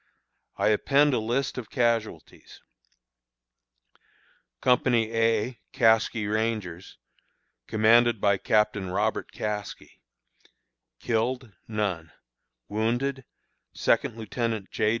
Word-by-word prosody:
I - - +2
append 140 +7 +3
a 120 - +2
list 125 +4 -2
of 115 - -9
casualties: 115 - -2 2.0
Company 120 -3 +2
A 115 +1 +1
(Caskie 110 -1 +3
Rangers), 105 -5 -3 0.7
commanded 115 +1 +4
by 100 -1 +2
Captain 105 -3 +1
Robert 105 +4 -1
Caskie. 105 -1 -6 1.0
Killed: 120 0 -2
None. 95 -7 -3 0.6
Wounded: 120 +5 -1 0.5
Second - - +1
Lieutenant 110 -2 -3
J. 105 - +1
110 Hz, 85 wpm, -26 LUFS, 105-120 Hz, 2.0 s, commanded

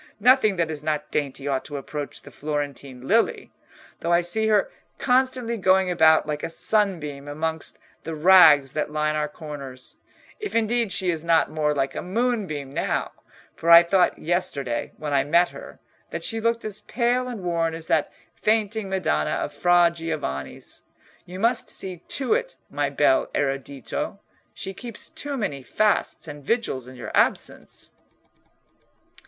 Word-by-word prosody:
Nothing 235 -2 +5
that 165 -3 0
is 150 -2 -5
not 150 -1 -2
dainty 140 -1 -2
ought 135 -2 0
to 145 -1 -5
approach 145 +1 -6
the - - -12
Florentine 145 -3 -4
lily; 230 +2 +1 0.5
though 170 - -2
I 170 0 +5
see 220 +6 +1
her 210 -2 +2 0.3
constantly 250 -2 +1
going 185 -1 +3
about 160 -2 +5
like 150 -1 -3
a - - -3
sunbeam 165 -8 0
amongst 160 +2 -4 0.3
the 165 0 -5
rags 155 -5 +7
that 150 - -1
line 150 0 0
our 150 0 0
corners—if 150 - -9
indeed 230 -1 +1
she 180 0 +1
is 165 -2 -4
not 165 -1 +3
more 150 -1 0
like 135 -1 0
a - - -4
moonbeam 185 - -2
now, - - -1 0.4
for 165 - -2
I 170 0 +10
thought 180 +1 +2
yesterday, 155 -8 -2
when 150 -1 -4
I 135 -1 +3
met 170 +5 +3
her, - - -11 0.3
that - - -5
she 225 -1 -1
looked 230 0 0
as 210 -1 -2
pale 245 +1 0
and 235 -6 -6
worn 165 -2 0
as 165 0 -5
that - - +1 0.2
fainting 215 -1 0
Madonna 175 - 0
of - - -3
Fra 175 -1 +4
Giovanni's. 150 - -5 0.5
You 180 +1 -8
must 230 +4 +1
see 185 -2 -5
to 265 - -1
it, - - -1 0.2
my - - 0
bel 330 0 +3
erudito: 135 -2 -3 0.4
she 195 - -5
keeps 235 +1 -6
too 285 -1 -5
many 150 - -3
fasts 210 +4 0
and 145 -1 -9
vigils 140 - -1
in 130 - -11
your - - -7
absence." - - 0
170 Hz, 160 wpm, -24 LUFS, 145-215 Hz, 0.5 s, I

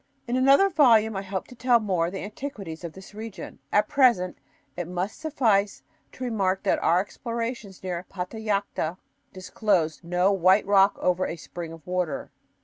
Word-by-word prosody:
In 240 - -1
another 275 +9 +5
volume 230 - +4
I 195 - -2
hope 190 -1 -4
to 250 - -12
tell 240 0 +3
more 185 -6 0
of 175 - -6
the 190 - -5
antiquities 205 - -7
of 170 -2 -6
this 190 +2 -13
region. 220 0 -8
At 210 0 +3
present 235 -10 +3 0.4
it 175 -2 -4
must 180 +3 -4
suffice 220 -10 +1 0.3
to 260 - -8
remark 195 -6 0
that - - +2
our 170 +2 +3
explorations 230 -1 -5
near 180 -2 -3
Patallacta 200 -3 -3 0.3
disclosed 185 -4 -1
no 180 +3 +2
"white 190 +1 +4
rock 200 0 +4
over 180 0 +1
a - - -4
spring 170 0 -8
of 165 -2 -12
water." 180 -4 -2
195 Hz, 165 wpm, -26 LUFS, 180-225 Hz, 0.4 s, another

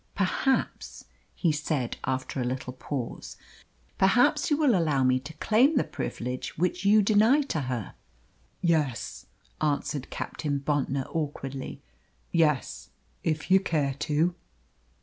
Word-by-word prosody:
"Perhaps," 205 +7 -1 0.3
he 170 - +2
said 150 -4 -2
after 130 +1 -2
a - - 0
little 125 +1 -3
pause, 130 -1 -5 0.6
"perhaps 250 +9 +4
you 295 - +3
will 295 -5 +4
allow 155 -8 +2
me 130 0 +3
to 145 +4 -10
claim 235 - +3
the - - +4
privilege 125 +2 -5
which 180 +4 0
you 210 +1 +5
deny 220 +8 +4
to 160 - -2
her?" 120 -6 -3 0.7
"Yes," 155 -8 0 0.3
answered 145 -2 -1
Captain 145 -2 -3
Bontnor 140 -1 -1
awkwardly; 140 -4 -4 0.5
"yes, 155 -5 +1 0.3
if 160 +3 -1
you 190 - +8
care 150 -7 0
to." 160 +4 +1
155 Hz, 125 wpm, -27 LUFS, 135-195 Hz, 0.7 s, you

